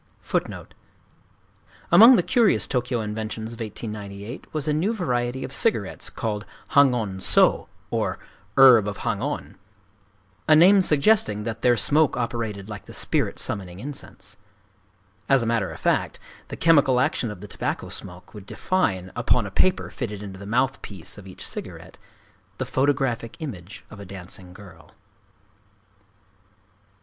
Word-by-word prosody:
Among 225 +9 +9
the 180 - +2
curious 235 -2 +3
Tōkyō 125 -3 -1
inventions 110 +1 -5
of 115 - -12
1898 105 +1 -7
was 155 -1 -3
a 150 - +2
new 190 +10 0
variety 125 - -2
of - - -6
cigarettes - - -1
called 105 -2 -3 0.3
Hangon 125 -9 +3
sō, - - +3 0.2
or - - -1 0.4
"Herb 125 -6 +8
of 105 - -4
Hangon,"—a 100 +3 -4
name 190 +5 +7
suggesting 150 - +2
that 115 0 -5
their 120 -1 +3
smoke 150 +7 +2
operated 115 -5 -3
like 105 -2 -8
the - - -12
spirit - - -1
summoning 95 -3 -3
incense. 100 -8 -9 0.9
As 135 -3 +4
a - - -2
matter 115 -5 0
of 80 - -9
fact, - - 0 0.3
the - - -7
chemical 145 -6 +4
action 125 -2 0
of 105 -3 -8
the 105 - -9
tobacco - - -4
smoke 90 +1 -8
would 100 -3 -11
define, 95 - -1
upon 120 -4 +1
a 100 - -7
paper 185 - +1
fitted 105 -5 -5
into 95 -2 -9
the 100 - -9
mouth 125 +4 0
piece 100 0 -8
of 95 - -13
each 95 - -7
cigarette, - - -8 0.6
the 130 - -3
photographic 130 -2 0
image 100 - -8
of 105 - -11
a 100 - -9
dancing 90 -1 -9
girl. 90 -5 -15
110 Hz, 140 wpm, -24 LUFS, 100-135 Hz, 0.9 s, Among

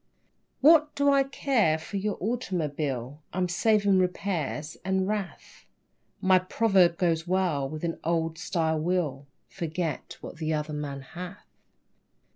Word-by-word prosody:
What 305 +1 +6
do 285 0 +3
I 275 0 +5
care 265 - +1
for 160 +5 -6
your 205 +1 -2
automobile? 150 - -2
I'm 180 +1 0
saving 200 +2 +3
repairs 170 -5 -2
and 190 0 0
wrath, 205 -3 -5 0.5
My 185 0 +5
proverb 185 -3 +3
goes 165 -2 +1
well 175 -7 +1
with 155 +2 -7
an 165 -1 -2
old 165 -1 -1
style 165 -4 0
wheel; 155 -5 -1 0.2
"Forget 165 -3 -4
what - - -9
the 160 -1 -1
other 150 0 -3
man 145 -2 -4
hath." 180 +7 -9
175 Hz, 130 wpm, -27 LUFS, 155-195 Hz, 0.5 s, What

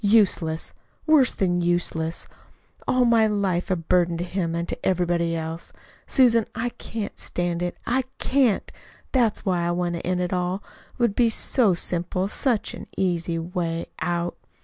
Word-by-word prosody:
Useless, 195 -7 +2 0.3
worse 305 -6 +5
than 175 -2 0
useless 170 -2 -1 0.6
all 255 -1 +3
my 230 -2 +5
life 195 -4 0
a 185 - +2
burden 170 0 +1
to 170 - -2
him 175 -2 -2
and 170 0 -2
to - - -5
everybody 175 -2 +1
else. 160 +1 -5 0.4
Susan, 235 -5 +4
I 230 +2 -1
can't 225 -3 -6
stand 175 -1 -2
it. 175 0 -2
I 255 +1 +1
CAN'T. 255 -7 +2 0.4
That's 235 -5 +2
why 180 -3 +1
I - - 0
want 175 0 0
to 170 - -3
end 180 +1 0
it 180 0 -1
all. 180 +2 -1 0.3
It - - -24
would 235 -4 +3
be 235 -2 +4
so 220 -3 +3
simple 180 +2 -1
such 235 +1 0
an - - -8
easy 170 -3 0
way 165 0 -2
out." 175 0 -1
180 Hz, 165 wpm, -24 LUFS, 170-220 Hz, 0.6 s, worse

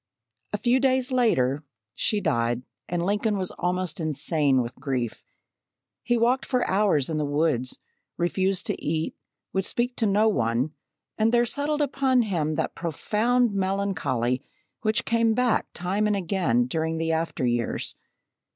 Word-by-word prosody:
A - - -1
few 250 +1 +2
days 260 0 +2
later, 150 - +2 0.3
she 210 -2 +1
died 120 -7 0 0.3
and 175 0 -1
Lincoln 205 +2 +1
was 185 -2 -2
almost 180 -1 -2
insane 150 -3 +2
with 120 - -6
grief. 130 -4 -3 0.8
He 240 - +1
walked 245 +4 +2
for 255 -2 0
hours 190 -9 +2
in 160 - -2
the 150 - 0
woods, 145 -4 0 0.4
refused 190 +2 0
to - - -2
eat, 160 +1 -1 0.4
would 190 - +1
speak 245 +5 -1
to 225 - +2
no 205 +2 +3
one, 125 - +1 0.5
and 220 +1 +3
there 240 0 +4
settled 295 +4 0
upon 265 -3 +2
him 160 -7 -1
that - - -1
profound 215 +8 +1
melancholy 185 -11 0 0.4
which 215 0 +1
came 230 -1 +2
back, 250 -2 +2
time 195 +4 -1
and 210 - +2
again, 175 - +1
during 160 +5 -1
the 165 0 0
after 160 -4 -1
years. 120 -1 -1
185 Hz, 150 wpm, -26 LUFS, 150-225 Hz, 0.8 s, there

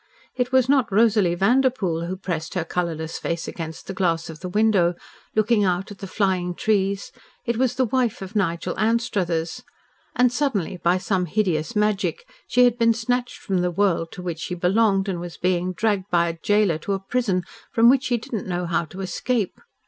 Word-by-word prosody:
It 250 0 -1
was 260 -1 +4
not 265 -5 +3
Rosalie 205 -4 +3
Vanderpoel 195 -5 +1
who 185 - -3
pressed 165 -4 -4
her 175 - 0
colourless 165 -3 -3
face 170 0 -3
against 160 -2 -6
the 195 - -5
glass 170 -3 0
of 155 - -12
the 180 - -5
window, 195 -4 +3 0.4
looking 215 0 +3
out 185 +1 0
at 205 - -10
the 195 - -6
flying 185 -3 0
trees; 200 -1 0 0.3
it 235 -1 -1
was 255 0 +1
the 260 0 +2
wife 245 -1 0
of 190 +3 -10
Nigel 170 -5 0
Anstruthers, 205 -8 0 0.5
and 245 -1 +3
suddenly, 235 - -1
by 175 +1 +2
some 185 -1 -1
hideous 180 0 0
magic, 210 - 0 0.2
she 250 - +4
had 245 -1 +3
been 230 -1 +4
snatched 245 +2 -1
from 190 -3 -1
the 180 - +1
world 175 -2 +1
to 180 - -8
which 170 -3 -4
she 180 - -4
belonged 195 +2 +2
and 185 -3 -2
was 175 -1 -7
being 180 0 0
dragged 205 0 0
by 170 -1 +2
a - - -3
gaoler 195 -1 +1
to 200 - -2
a 195 - -1
prison 195 -3 0 0.3
from 230 0 +5
which 265 +1 +5
she 245 - +1
did 230 - -11
not 215 - -3
know 180 -1 -2
how 170 0 0
to 185 +5 -9
escape. 210 +2 -2
195 Hz, 195 wpm, -23 LUFS, 175-230 Hz, 0.5 s, from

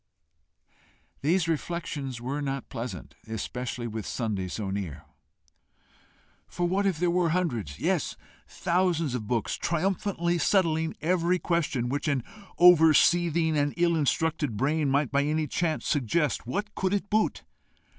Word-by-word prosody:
These 165 +4 +2
reflections 150 -5 -3
were 135 +5 -3
not 135 -1 -4
pleasant, 120 -1 -6
especially 120 +2 -4
with 110 -2 -5
Sunday 105 -6 -2
so 95 +1 -4
near. 90 -7 -5 1.4
For 175 0 -1
what 195 +3 +1
if 185 -5 0
there 175 +1 +1
were 175 -1 +2
hundreds, 120 - -1
yes, - - 0 0.3
thousands 170 -5 0
of 110 -4 -4
books, 115 -2 -1
triumphantly 175 0 -1
settling 160 -2 +2
every 175 +2 +2
question 155 -9 -1
which 145 +5 -2
an 140 -5 +1 0.3
over 160 -3 +7
seething 170 -2 +3
and 145 -1 0
ill 170 -1 +3
instructed 150 -4 0
brain 145 +4 +1
might 140 0 +1
by 140 +1 +3
any 155 +2 0
chance 160 +1 -1
suggest, 145 -1 0
what 210 +11 -3
could 190 +1 0
it 200 - -2
boot? 215 +1 +1
155 Hz, 135 wpm, -27 LUFS, 125-175 Hz, 1.4 s, over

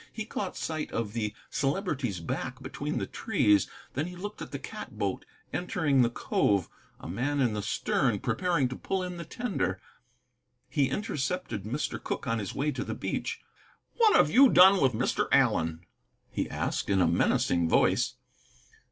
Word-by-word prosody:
He 220 -1 -5
caught 200 -3 -4
sight 155 -1 -3
of 110 -2 -2
the 105 -2 -2 0.2
Celebrity's 135 - -1
back 125 +9 -4
between 145 +3 -4
the - - -1
trees, 115 - +2 0.2
then 145 +5 -1
he 180 - -8
looked 205 +4 -7
at - - -6
the - - -3
cat - - -8
boat - - -2 0.3
entering 160 -6 +1
the 120 - +4
cove, 100 -4 +1 0.3
a - - -9
man 135 - -1
in 120 -5 +2
the 105 - -2
stern 110 +2 +1
preparing 140 - +1
to 130 - -5
pull 190 +6 -2
in 180 -1 -5
the 170 - -6
tender. 185 - -2 0.9
He 135 -2 +2
intercepted 150 - -2
Mr. 130 +8 -3
Cooke - - -3
on 115 -2 0
his 100 -3 -5
way 150 +2 0
to 135 - -3
the - - -4
beach. - - -3 0.6
"What 450 -3 +5
have 150 - +5
you 265 +3 +7
done 190 -1 +7
with 130 -2 +4
Mr. 110 - 0
Allen?" 80 0 +3 0.5
he - - -2
asked, - - -2
in 100 -1 +3
a 90 - +5
menacing 85 0 +2
voice. - - +3
135 Hz, 170 wpm, -29 LUFS, -, 0.9 s, you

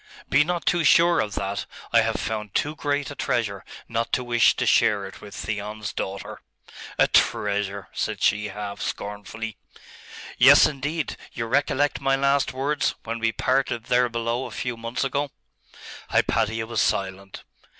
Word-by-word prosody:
'Be 145 +2 +6
not 175 +1 -2
too 175 -1 +2
sure 170 +3 +5
of 105 -1 -1
that. 100 0 -3 0.3
I - - +7
have - - 0
found 105 -2 -4
too 150 +1 0
great 145 -1 -1
a - - -8
treasure 100 -8 -1 0.2
not 115 0 -2
to 125 - +1
wish 120 -2 +4
to - - -1
share 100 -2 +3
it 95 - -11
with 105 -1 -10
Theon's 105 0 -4
daughter.' 95 0 -5 0.6
'A - - +4
treasure?' 100 -1 +1
said - - -2
she, 105 0 +2
half 105 -1 -6
scornfully. 105 +2 -5 0.8
'Yes, - - +8
indeed. 150 +2 -2 0.2
You 115 - -3
recollect 140 +3 +1
my 135 0 +2
last 140 0 +2
words, 140 +3 -1
when 115 +1 -4
we 115 0 +1
parted 130 -1 0
there 125 0 +2
below 115 +2 -2
a - - -9
few 125 -1 -4
months 115 +3 -3
ago?' 140 +1 -1 0.8
Hypatia 110 +1 +1
was 115 -1 -1
silent. 95 0 -2
115 Hz, 160 wpm, -24 LUFS, 105-135 Hz, 0.8 s, Yes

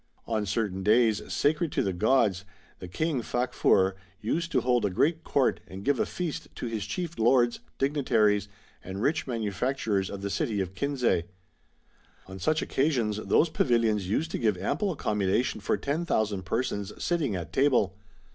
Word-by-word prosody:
On 110 -3 -1
certain 100 -2 -1
days, 110 +1 +3
sacred 155 +2 +1
to - - +1
his 95 - 0
gods, 105 -1 +2 0.4
the 90 - -7
King 145 - -1
Facfur 115 -6 +2
* 90 +2 -32
used 165 0 -1
to - - +2
hold 125 -2 +2
a 100 - +2
great 160 - +1
court 140 -4 +1
and 95 +1 -9
give 140 -2 +2
a - - +1
feast 165 -3 -4
to - - -5
his 110 -3 -3
chief 170 - -4
lords, 120 +1 +3 0.2
dignitaries, 110 -8 +2 0.4
and 95 +1 -6
rich 155 +2 +1
manufacturers 110 -2 -1
of 100 0 -7
the 100 - -2
city 105 0 -1
of 95 -1 -3
Kinsay. 125 -7 0 1.0
On 95 0 -9
such 155 - +1
occasions 125 -7 0
those 155 +9 +2
pavilions 115 -9 +1
used 160 +10 0
to - - -2
give 110 -5 +1
ample 190 - -1
accommodation 105 - 0
for - - 0
10,000 110 - -1
persons 100 0 -2
sitting 155 - 0
at 85 -2 -6
table. 125 -8 +3
115 Hz, 165 wpm, -28 LUFS, 100-140 Hz, 1.0 s, days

